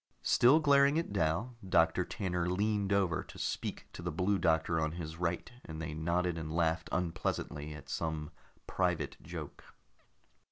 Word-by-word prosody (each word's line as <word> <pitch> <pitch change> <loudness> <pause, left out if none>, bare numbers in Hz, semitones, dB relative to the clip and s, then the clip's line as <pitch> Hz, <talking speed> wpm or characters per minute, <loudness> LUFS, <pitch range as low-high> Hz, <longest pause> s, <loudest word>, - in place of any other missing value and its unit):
Still 130 +6 +6
glaring 140 -1 +5
at 165 -10 -2
Dal, 100 +7 0
Doctor 90 -1 +3
Tanner 90 -2 -2
leaned 100 +1 0
over 95 -4 +2
to - - -13
speak - - -3
to - - -8
the 90 - -2
Blue 95 +5 +1
Doctor 80 -1 +2
on 80 0 -1
his 80 -2 -6
right, 85 +3 -2
and 80 -1 -7
they 80 -1 -4
nodded 85 +2 0
and 80 -1 -5
laughed 80 +1 0
unpleasantly 80 -3 -2
at 70 -2 -11
some 80 0 -3 0.3
private - - 0
joke. - - -8
85 Hz, 155 wpm, -33 LUFS, 80-100 Hz, 0.3 s, Still